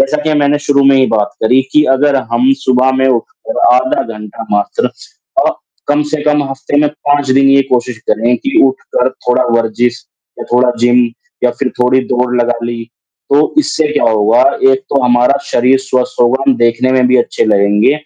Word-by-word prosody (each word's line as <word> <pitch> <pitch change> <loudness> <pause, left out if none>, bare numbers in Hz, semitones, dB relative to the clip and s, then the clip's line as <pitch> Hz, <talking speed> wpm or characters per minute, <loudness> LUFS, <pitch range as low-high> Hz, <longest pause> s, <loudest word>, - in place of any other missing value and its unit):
जैसा 150 +2 0
कि 155 0 -1
मैंने 145 +1 +1
शुरू 140 -1 +3
में 135 0 +4
ही 130 -1 +3
बात 105 -1 -1
करी 125 +4 +3
कि 150 - +4
अगर 145 0 +1 0.2
हम 125 +3 +2
सुबह 130 +1 +2
में 130 - +2
उठकर 120 -3 -3 0.2
आधा 130 +1 0 0.2
घंटा 105 +1 -9
मात्र 105 0 -1 0.6
अ, - - +3 0.4
कम 145 +1 +2
से 150 - -3
कम 150 -1 +1
हफ़्ते 135 +2 -4
में 150 - +2
5 145 -2 -2
दिन 135 +1 +3
ये 140 0 +4
कोशिश 120 -2 -2
करें 120 +3 +1
कि 275 - -2
उठकर 465 +4 -2 0.2
थोड़ा 125 +1 +2 0.2
वर्जिश 120 +2 -2 0.3
या - - -6
थोड़ा 125 0 +3
जिम 120 0 +3 0.4
या 125 - +3
फ़िर 130 +1 -3
थोड़ी 125 +1 +2
दौड़ 125 0 -1
लगा 120 0 -1
ली, 115 -1 -5 0.5
तो 150 - +2
इससे 295 - 0
क्या 145 - 0
होगा, 110 +2 +2 0.3
एक 405 - +1
तो 140 - +1
हमारा 125 +2 +2
शरीर 130 +2 +2
स्वस्थ 130 -1 -2
होगा, 125 +3 +2
हम 135 - +3
देखने 120 +2 +1
में 130 -1 +2
भी 130 - +3
अच्छे - - -1
लगेंगे, 105 +2 +2
130 Hz, 190 wpm, -12 LUFS, 120-140 Hz, 0.6 s, में